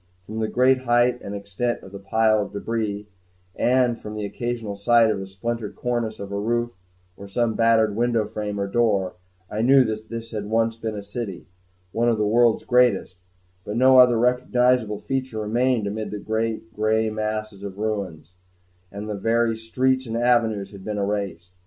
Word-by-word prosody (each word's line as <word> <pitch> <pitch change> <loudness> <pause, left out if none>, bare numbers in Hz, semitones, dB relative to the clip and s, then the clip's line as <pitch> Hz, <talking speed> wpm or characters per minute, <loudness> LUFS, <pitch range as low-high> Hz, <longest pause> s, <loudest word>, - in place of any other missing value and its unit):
From 110 +3 -6
the 110 - 0
great 130 +3 +3
height 120 +1 +3
and 100 - -6
extent 100 +4 -3
of 95 - -12
the 100 - -8
piles 110 +1 +2
of - - -18
debris, 105 -1 -3 0.5
and 125 -1 +2
from 105 0 -8
the 105 -1 -3
occasional 115 0 -4
sight 115 +2 +4
of 100 - -2
the 95 - -6
splintered 110 +3 -4
cornice 120 -3 -2
of 100 0 -7
a 100 - -2
roof 120 +2 -1 0.4
or 100 - -10
of 100 - -13
some 120 +1 +1
battered 110 -2 +3
window 115 -1 +1
frame 105 -1 -4
or 100 - 0
door, 100 -4 +1 0.3
I 105 - -3
knew 135 +3 +6
that 110 -2 -4
this 115 0 -6
had 105 -2 -4
once 115 +1 +1
been 115 -1 -4
a 100 - -6
city, 100 -2 -6 0.5
one 120 +3 +1
of 115 - +1
the 105 - +1
world's 115 +2 +3
greatest; 120 -7 +2 0.5
but 105 +3 -4
no 130 +1 +6
other 125 -2 +6
recognizable 125 -2 +2
feature 130 0 -3
remained 120 +1 +1
amid 105 +2 -3
the 105 - -5 0.6
gray 110 +1 +1
masses 110 -1 -3
of 100 -1 -7
ruins, 100 -7 -4 0.6
and 100 +1 -6
the 105 - -3
very 115 +3 +1
streets 130 +3 0
and 115 0 -3
avenues 115 -4 +1
had 100 -2 -11
been 105 0 -4
erased. 100 -4 -3
110 Hz, 185 wpm, -23 LUFS, 105-120 Hz, 0.6 s, knew